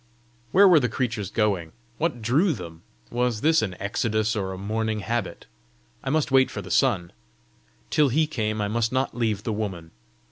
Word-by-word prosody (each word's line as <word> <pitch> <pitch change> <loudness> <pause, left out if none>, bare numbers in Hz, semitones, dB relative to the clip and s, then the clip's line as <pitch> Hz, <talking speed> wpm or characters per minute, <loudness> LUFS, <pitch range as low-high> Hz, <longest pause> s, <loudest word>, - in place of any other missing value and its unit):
Where 200 +2 +7
were 175 -4 +7
the 125 -3 0
creatures 110 -5 -2
going? 95 -7 0 0.3
What 155 -8 -1
drew 155 - +3
them? 85 - -9 0.3
Was 120 -2 0
this 160 +1 +4
an 95 -5 -3
exodus, 110 +2 0
or 95 -3 -2
a 95 - -6
morning 110 +2 -2
habit? 115 -5 -3 0.6
I 135 - -3
must 150 -1 +1
wait 130 -1 +5
for 100 - -6
the 95 - -9
sun! 95 -7 +2 0.8
Till 150 -2 +4
he 155 +6 +2
came 110 -8 -2
I 105 - 0
must 115 +2 0
not 130 -1 -1
leave 110 -4 -1
the 110 - -2
woman! 95 -6 -4
110 Hz, 180 wpm, -25 LUFS, 100-130 Hz, 0.8 s, Where